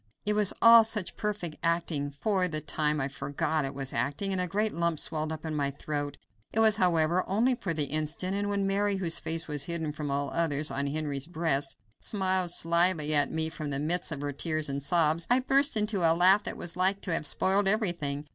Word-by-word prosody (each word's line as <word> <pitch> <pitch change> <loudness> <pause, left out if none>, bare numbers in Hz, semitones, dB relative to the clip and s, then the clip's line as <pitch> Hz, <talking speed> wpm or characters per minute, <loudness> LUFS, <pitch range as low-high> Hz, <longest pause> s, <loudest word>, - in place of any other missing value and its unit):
It 210 - +1
was 210 -2 +3
all 230 0 +9
such 215 -4 -1
perfect 205 -7 -4
acting 165 -3 -1
that 145 -1 -8
for 190 +4 0
the 155 -3 -4
time 150 0 -1
I 135 - -1
forgot 140 +2 -3
it 135 0 -6
was 135 -1 -3
acting, 145 +11 -2
and 185 -1 -1
a 180 - -1
great 210 +5 -1
lump 170 -1 0
swelled 155 -1 -2
up 160 0 -7
in 160 - -4
my 145 -2 -1
throat. 145 0 -5 0.3
It 220 - +1
was, 220 -1 +4
however, 175 -1 +2
only 230 +7 +2
for 200 -7 -4
the 155 -2 -1
instant, 155 +6 -2
and 205 0 -2
when 200 -1 -1
Mary, 200 +1 0
whose 175 -4 +2
face 165 0 -3
was 145 -2 -2
hidden 160 -2 -3
from 150 -1 -6
all 140 0 -2
the - - -6
others, 155 -2 0
on 140 +1 -2
Henry's 145 -1 -3
breast, 160 -5 -1 0.2
smiled 185 -3 +1
slyly 170 -2 +2
at 145 -1 +3
me 160 0 -2
from 155 -2 -6
the 140 - -2
midst 165 +5 -1
of 145 -3 -4
her 145 0 -3
tears 155 +1 -2
and 140 0 -3
sobs, 160 +2 +1
I 245 +1 +4
burst 275 0 +3
into 210 -1 +1
a 165 -1 +4
laugh 190 +4 +5
that - - -4
was 170 - -5
like 190 +2 +1
to 180 - -2
have 155 - 0
spoiled 195 +5 +2
everything. 170 -9 0
165 Hz, 225 wpm, -28 LUFS, 150-195 Hz, 0.3 s, all